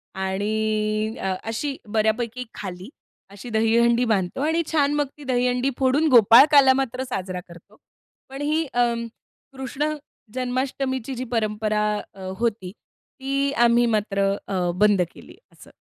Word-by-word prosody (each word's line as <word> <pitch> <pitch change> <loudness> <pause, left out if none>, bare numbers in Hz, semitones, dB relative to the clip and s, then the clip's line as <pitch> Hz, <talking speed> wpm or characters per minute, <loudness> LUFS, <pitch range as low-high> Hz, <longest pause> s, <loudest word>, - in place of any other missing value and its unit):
आणि 215 +3 -1
अ, 190 0 -1
अशी 250 +6 -3
बऱ्यापैकी 225 +3 -1
खाली, 185 +1 -7 0.4
अशी 200 +4 -10
दहीहंडी 235 +2 +3
बांधतो 205 +1 -1
आणि 320 +3 +1
छान 290 -2 +2
मग 290 -1 0
ती 295 - -12
दहीहंडी 250 0 0
फोडून 275 +4 +2
गोपाळकाला 265 +4 +7
मात्र 260 -1 -2
साजरा 185 -5 -4
करतो. 170 0 -16 0.5
पण 270 +1 -7
ही 310 +2 0
अ, 240 -1 +2 0.7
कृष्ण 270 +3 -2 0.4
जन्माष्टमीची 260 0 -2
जी 250 - -4
परंपरा 215 -2 0 0.3
अ, 195 - -13 0.2
होती, 220 -6 -2
ती 275 +5 -5
आम्ही 235 0 +4
मात्र 200 -3 0 0.2
अ, 180 -3 -1
बंद 205 -2 +4
केली - - -15
असं. - - -17
235 Hz, 130 wpm, -23 LUFS, 210-265 Hz, 0.7 s, गोपाळकाला